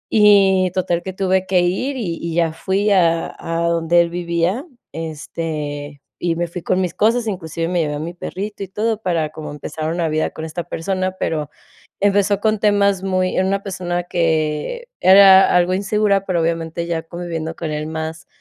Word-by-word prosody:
y 195 -3 +5
total 175 -2 0
que 190 - -4
tuve 190 -1 0
que 185 -2 +3
ir, 195 +11 -1
y 175 -9 -3
y 170 -1 -4
ya 165 -2 +1
fui 195 +5 0
a 170 -3 +2
a 165 0 -2
donde 170 0 +2
él 170 - 0
vivía, 175 - -1 0.3
este, 150 -2 -5 0.2
y 170 -1 0
me 175 +1 -1
fui 175 +1 -7
con 185 - +1
mis 180 -2 -2
cosas, 230 +3 +2
inclusive 165 -4 -3
me 175 -2 +1
llevé 150 -1 -2
a - - -4
mi 165 +3 -5
perrito 200 +4 -6
y - - -6
todo, 220 +2 -1
para, 165 -5 0
como, 155 -1 -8
empezar 155 +2 -4
una 170 -2 0
vida 155 +1 0
con 160 - -7
esta 165 +2 -5
persona. 185 +2 -2
Pero 150 -2 -2 0.5
empezó 205 0 +2
con 215 -1 +1
temas 200 -2 +2
muy 185 -1 0
era 190 0 +2
una 195 0 -1
persona 175 -2 -3
que 165 - -1
era 190 0 +8
algo 180 +1 +3
insegura, 200 0 +1
pero, 175 -3 0
obviamente, 165 0 -2
ya 165 -1 -1
conviviendo 165 -1 -5
con 160 -2 -4
él 150 0 -3
más 160 +1 -5
175 Hz, 185 wpm, -19 LUFS, 165-195 Hz, 0.5 s, era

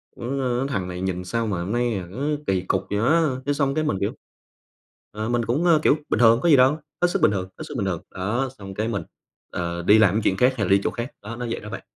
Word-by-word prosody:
"Ng 130 +1 -2
thằng 95 -9 -2
này 90 0 -5
nhìn 90 -1 -2
sao 115 +5 -1
mà 95 -5 -2
hôm 95 - -4
nay, 120 -1 0
à, 90 -2 -6
nó 100 - -8 0.3
kỳ 95 -1 +1
cục 90 - -1
vậy 100 - -1
á?" 155 +10 +3 0.2
Thế 145 - +1
xong 140 -1 0
cái 155 - +1
mình 150 -10 0
kiểu - - 0 1.0
ờ, 110 +2 -4
mình 120 -1 0
cũng, 130 +10 0
ờ, 165 -3 +5
kiểu: - - +5
bình - - +1
thường, 115 -1 +6
có 170 - +2
gì 150 - +8
đâu, 130 +4 +5 0.2
hết 175 - +5
sức 175 - -1
bình - - +5
thường, 95 -2 -3
hết - - -6
sức - - -8
bình 100 - -1
thường. 90 -4 -2
Đó, 115 +8 -2
xong 95 -3 -9
cái 110 +3 -2
mình, 105 -4 -2 0.5
ờ, 85 0 -3
đi 105 +5 +6
làm 100 -4 +5
cái 110 - +1
chuyện 95 - +1
khác 125 +5 +4
hay 105 - 0
là - - -1
đi 100 0 +5
chỗ - - +1
khác, 120 +3 -5
đó 110 +3 -6
nó 120 +1 -5
vậy 115 - -3
đó 105 - -9
bạn. - - -6
115 Hz, 285 wpm, -23 LUFS, 95-130 Hz, 1.0 s, gì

